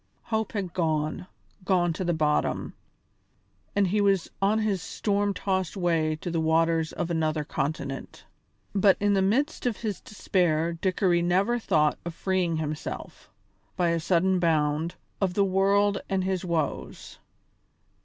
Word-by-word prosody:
Hope 220 -1 -2
had 190 -5 -3
gone, 160 +1 -1 0.4
gone 180 -3 +2
to 185 - -4
the 175 - +1
bottom, 150 -1 0 1.0
and 200 -1 +4
he 210 +3 +2
was 195 -3 +2
on 200 +3 +3
his 210 -4 0
storm 205 +2 0
tossed 190 -1 -2
way 165 -4 +1
to 175 - -4
the 165 - 0
waters 160 0 +2
of 175 - -3
another 155 -2 0
continent. 140 -1 -4 0.5
But 195 -1 +4
in 205 0 +2
the 195 - +3
midst 250 +9 +1
of 235 - -1
his 215 -4 -4
despair 170 -5 0
Dickory 180 0 +1
never 190 +7 +2
thought 155 -8 +2
of 170 -1 -6
freeing 180 -3 0
himself, 155 -1 -5 0.5
by 175 -2 +2
a 170 0 +1
sudden 185 +2 +2
bound, 160 -1 +1 0.3
of 185 -2 0
the 200 - +3
world 195 +1 +2
and 190 -1 0
his 190 -1 -1
woes. 165 -5 -3
180 Hz, 145 wpm, -27 LUFS, 160-195 Hz, 1.0 s, and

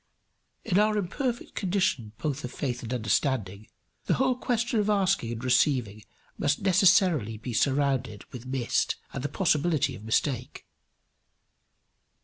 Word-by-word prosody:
In 185 - +2
our 215 0 +3
imperfect 235 +6 -3
condition 175 - -1
both 145 -3 -3
of 125 - -5
faith 125 -4 -3
and 115 - -7
of - - 0
understanding, 110 -2 -1 0.4
the - - +2
whole 260 -1 +2
question 240 -2 0
of 210 0 0
asking 195 - +1
and 115 +1 -6
receiving 125 -5 +1 0.4
must - - 0
necessarily 180 - +4
be 120 +3 -6
surrounded 130 -3 0
with 125 0 -8
mist 130 -2 0 0.2
and 135 - -4
the 145 - -2
possibility 150 -3 +1
of 105 - -11
mistake. 125 +3 -1
140 Hz, 135 wpm, -27 LUFS, 120-190 Hz, 0.4 s, necessarily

